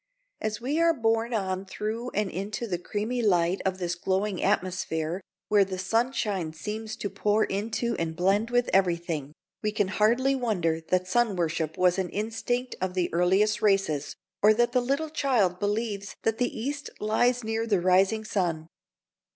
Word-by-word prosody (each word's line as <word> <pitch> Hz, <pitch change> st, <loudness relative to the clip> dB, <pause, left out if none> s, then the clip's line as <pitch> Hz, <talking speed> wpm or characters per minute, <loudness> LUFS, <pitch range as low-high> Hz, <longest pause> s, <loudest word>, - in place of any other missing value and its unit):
As 215 Hz, -1 st, -2 dB
we 280 Hz, +6 st, -1 dB
are 335 Hz, -1 st, +4 dB
borne 225 Hz, -1 st, +1 dB
on 190 Hz, -4 st, -1 dB
through 215 Hz, +5 st, -4 dB
and 210 Hz, -1 st, 0 dB
into 200 Hz, +5 st, -4 dB
the 180 Hz, -6 st, -2 dB
creamy 215 Hz, +6 st, -2 dB
light 180 Hz, -3 st, +2 dB
of 190 Hz, -1 st, -1 dB
this 175 Hz, -2 st, -2 dB
glowing 190 Hz, +2 st, -1 dB
atmosphere, 175 Hz, -1 st, -1 dB, 0.3 s
where 205 Hz, -1 st, +5 dB
the 190 Hz, -1 st, -5 dB
sunshine 200 Hz, -4 st, 0 dB
seems 215 Hz, +6 st, -5 dB
to 220 Hz, -, -3 dB
pour 205 Hz, +2 st, +1 dB
into 225 Hz, +4 st, -1 dB
and 165 Hz, -1 st, -2 dB
blend 195 Hz, +6 st, +2 dB
with 245 Hz, 0 st, +2 dB
everything, 170 Hz, -6 st, +1 dB, 0.3 s
we 215 Hz, -, 0 dB
can 205 Hz, -2 st, 0 dB
hardly 235 Hz, +7 st, +3 dB
wonder 180 Hz, -11 st, 0 dB
that 185 Hz, 0 st, +1 dB
sun 230 Hz, +1 st, +2 dB
worship 160 Hz, -2 st, -1 dB
was 180 Hz, +1 st, +3 dB
an 185 Hz, -2 st, -1 dB
instinct 245 Hz, +4 st, -2 dB
of 185 Hz, 0 st, -2 dB
the 180 Hz, -2 st, 0 dB
earliest 190 Hz, +5 st, +3 dB
races, 195 Hz, -8 st, +1 dB, 0.3 s
or 215 Hz, +1 st, +6 dB
that 240 Hz, +1 st, +2 dB
the 250 Hz, 0 st, +2 dB
little 280 Hz, +5 st, -1 dB
child 225 Hz, -, +1 dB
believes 205 Hz, -1 st, -2 dB
that 225 Hz, +1 st, 0 dB
the 245 Hz, -, +2 dB
East 285 Hz, +5 st, -3 dB
lies 245 Hz, +3 st, +2 dB
near 225 Hz, +1 st, -1 dB
the 205 Hz, -4 st, +2 dB
rising 190 Hz, +5 st, +3 dB
sun. 170 Hz, -7 st, -1 dB
205 Hz, 165 wpm, -27 LUFS, 185-230 Hz, 0.3 s, or